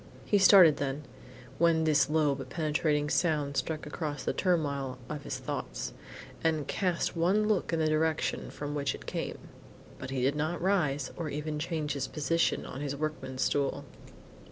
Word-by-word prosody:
He 205 - +3
started 185 -5 +8
then, 140 +1 -3 0.6
when 165 -1 +4
this 150 -3 +3
low 150 -2 +3
but 135 -2 -7
penetrating 150 -1 0
sound 150 -3 +1
struck 155 +2 -2
across 150 -1 -4
the - - -1
turmoil 140 -8 0
of 150 -1 -5
his 130 - -3
thoughts, 135 +1 -4 0.5
and 155 -3 +1
cast 180 -3 0
one 190 +6 +2
look 210 -4 +1
in 165 - +1
the 160 - +1
direction 155 0 0
from 145 0 -5
which 145 -1 -1
it - - -12
came; - - -4 0.6
but 130 - -6
he 130 -2 -1
did 135 +3 +2
not 155 +3 -1
rise, 150 -8 +1
or 165 -3 -4
even 150 +1 -3
change 155 -2 -2
his 140 -2 -2
position 165 +2 0
on 135 - -7
his 140 -1 -2
workman's 140 -3 -3
stool. 140 -1 0
150 Hz, 170 wpm, -30 LUFS, 140-165 Hz, 0.6 s, started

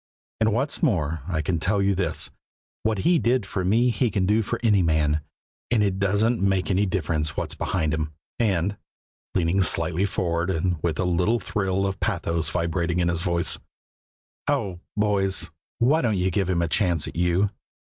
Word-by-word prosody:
And, 110 0 +3
what's 135 - -1
more, 80 - +1
I 80 -4 -1
can 85 +2 0
tell 100 +5 +1
you 100 0 +2
this: 95 -3 -1 0.5
what 110 -3 -1
He 175 -1 +5
did 120 0 +1
for 95 -1 -3
me 115 +7 +3
He 115 +2 +1
can 95 -2 0
do 105 +3 +3
for 115 +3 -3
any 105 -4 +4
man, 75 -2 +2 0.5
and 115 -3 +3
it 95 -2 0
doesn't 105 +4 +2
make 95 -1 +1
any 100 +2 +2
difference 80 -4 -1
what's - - -2
behind 80 -5 -1
him, 80 -1 -2 0.3
and" 100 -3 +1 0.6
leaning 90 +1 +2
slightly 85 +1 +2
forward, 85 -2 -1
and 90 -2 -1
with 80 -2 -1
a 90 - 0
little 90 +6 +2
thrill 95 -2 -1
of 95 -1 -3
pathos 85 -5 -1
vibrating 85 0 -1
in 85 -1 +2
his 85 -1 0
voice 85 -2 0 0.9
"oh, 90 -3 -1 0.2
boys, 100 -3 +1 0.3
why 145 +7 +3
don't 110 -5 +1
you 90 +1 +1
give 95 +1 0
Him 85 -2 +1
a - - 0
chance 85 -4 +1
at - - -8
you? 90 +4 +2
95 Hz, 180 wpm, -24 LUFS, 85-105 Hz, 0.9 s, He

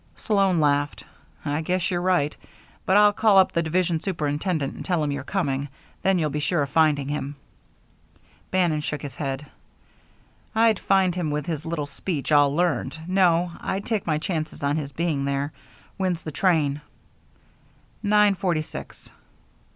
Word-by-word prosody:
Sloan 195 -5 +2
laughed. 145 -1 +1 0.4
"I 145 +1 -1
guess 180 +3 -1
you're 175 -1 0
right. 175 -5 +1 0.5
But 190 - +5
I'll 210 0 +6
call 210 -1 +4
up 190 - +6
the 170 - +1
division 170 0 0
superintendent 155 -3 -1
and - - -8
tell 175 -4 0
him 145 - -1
you're 140 -1 -3
coming. 140 -5 -1 0.3
Then 190 -1 +3
you'll 155 -4 0
be 150 - -2
sure 150 +1 +1
of 140 - -6
finding 150 -4 +3
him." 145 0 -3 1.1
Bannon 175 -5 +1
shook 150 -1 -4
his 140 -3 -6
head. 135 0 -3 1.1
"I'd 225 -2 +4
find 190 -2 +2
him 175 -3 -2
with 150 0 -2
his 160 -2 -4
little 160 -3 -2
speech 145 +1 -4
all 145 -1 +5
learned. 175 -1 0
No, 180 -2 +3
I'll 190 - -2
take 210 -3 -2
my 155 -2 +2
chances 155 -2 -4
on 140 +1 +1
his 145 -3 -3
being 155 -3 -1
there. 140 +1 -1 0.4
When's 185 -4 -1
the 155 - -5
train?" 150 -3 +1 1.2
"Nine 210 -1 +4
forty 175 -5 0
six." - - -10
160 Hz, 160 wpm, -24 LUFS, 145-185 Hz, 1.2 s, I'll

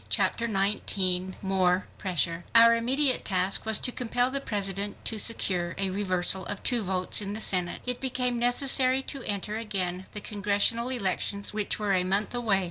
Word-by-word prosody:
Chapter 235 - +1
19 190 -3 0
More 185 -1 +1
Pressure 170 -2 -1
Our 230 0 +8
immediate 260 +4 +1
task 190 +2 +1
was 220 - +3
to 250 - 0
compel 245 +1 0
the 275 0 -1
President 200 -3 -3
to 220 - -2
secure 180 -6 +1
a 195 -1 -1
reversal 185 -1 0
of 205 - -5
two 245 -3 +1
votes 185 0 0
in 200 0 -4
the 215 - -5
Senate. 180 -4 0
It 250 -1 -2
became 250 -2 -1
necessary 255 +2 +3
to 275 -1 -5
enter 205 +1 -3
again 190 -4 -3
the 210 - -3
Congressional 210 +4 0
elections 200 -3 -2
which 210 -1 -2
were 210 -2 -1
a 185 -1 +2
month 195 +5 0
away. 225 -5 +1
205 Hz, 170 wpm, -27 LUFS, 190-235 Hz, -, Our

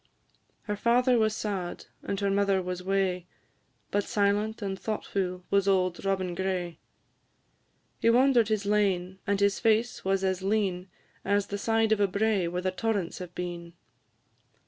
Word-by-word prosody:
Her 210 - -3
father 245 +3 +3
was 215 -1 +2
sad, 195 -5 -4 0.2
and 195 - -3
her 200 -1 +1
mother 200 -1 +2
was 180 0 -4
wae, 185 -2 0 0.6
But 205 - +1
silent 210 +1 0
and 195 -1 -2
thoughtfu' 185 -4 -3
was 200 0 +3
auld 185 -2 +1
Robin 190 -2 -1
Gray; 180 -2 -3 1.2
He - - +3
wander'd 245 -1 +4
his 215 -2 -1
lane, 190 -3 +1
and 200 0 +1
his 200 -1 +2
face 225 +1 +1
was 195 0 0
as 190 -1 0
lean 190 -2 -1 0.3
As 200 0 +1
the 200 - -2
side 225 +1 +1
of 220 - +3
a 200 - +4
brae 200 -2 +1
where 180 +1 -3
the 185 - 0
torrents 200 -2 -2
have 180 -1 -8
been. 175 -1 -5
195 Hz, 155 wpm, -28 LUFS, 185-215 Hz, 1.2 s, wander'd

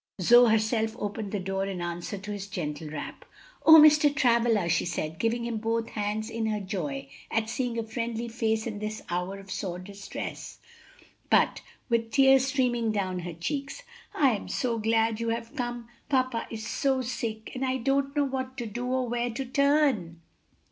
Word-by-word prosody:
Zoe 240 +6 +7
herself 220 0 +1
opened 205 0 -4
the 205 - -1
door 195 +1 -2
in 190 -2 -4
answer 175 +3 -4
to 200 +2 -7
his 200 -1 -5
gentle 155 -5 -4
rap. 150 -1 -7 0.4
"O 320 - +11
Mr. 300 -1 +8
Travilla!" 235 -7 +2
she 170 0 +2
said, 160 -2 -3
giving 235 +1 0
him 235 -1 -2
both 225 +1 -1
hands 210 +1 -2
in 225 -1 -2
her 215 -1 -1
joy 155 -9 -4 0.2
at 225 0 -1
seeing 245 -1 -2
a 230 - -1
friendly 230 +1 -3
face 220 -1 -1
in 215 -3 -4
this 215 +1 -5
hour 180 +3 -2
of 195 -1 -11
sore 180 -3 -3
distress, 200 +2 -7 0.7
but - - +3 0.3
with 230 -2 0
tears 270 0 +5
streaming 245 -4 +1
down 190 -3 -1
her 175 -1 -5
cheeks, 275 - -4 0.3
"I 275 -3 +4
am 210 - -3
so 235 -3 -1
glad 225 0 +1
you 230 0 -1
have 230 +3 -4
come! 240 -3 -4 0.2
Papa 255 -4 +1
is 220 -1 -6
so 265 -2 0
sick, 220 -2 -4
and 255 - -3
I 260 0 +1
don't 275 +3 0
know 290 -1 +3
what 260 -1 -4
to 240 - -3
do, 240 +3 -4
or 255 0 0
where 240 +1 -1
to 240 +4 -4
turn." 275 - +2
225 Hz, 185 wpm, -28 LUFS, 200-250 Hz, 0.7 s, O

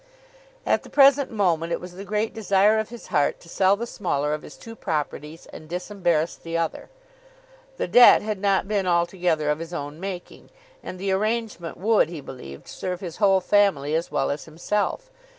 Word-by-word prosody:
At - - +2
the - - -14
present 280 0 +5
moment, 170 -7 0
it - - -1
was 180 0 -9
the 185 +3 -9
great 210 +2 -2
desire 210 0 +3
of 220 - -3
his 240 0 -11
heart 145 -1 +2
to - - -16
sell 190 +3 +3
the 235 - -3
smaller 150 -10 -2
of 150 - -3
his - - -12
two 225 0 -11
properties 155 -2 -4
and 155 - -11
disembarrass 175 -3 -1
the 165 0 -5
other. 165 -1 -3 0.9
The - - -2
debt 245 -3 +7
had 210 -2 -3
not 195 -1 +1
been 200 -3 0
altogether 170 -3 +1
of 150 - -2
his 165 +1 -6
own 145 0 -6
making, 185 -2 -7 0.3
and 185 - -7
the 195 +1 -2
arrangement 210 -3 -2
would, 210 -4 +3
he 170 -2 -7
believed, 95 - -10
serve 180 -1 -5
his 175 -4 -7
whole 195 -3 +4
family 185 -8 +2
as 165 +2 -1
well 135 - 0
as 145 0 -5
himself. 205 - -2
180 Hz, 185 wpm, -24 LUFS, 160-205 Hz, 0.9 s, debt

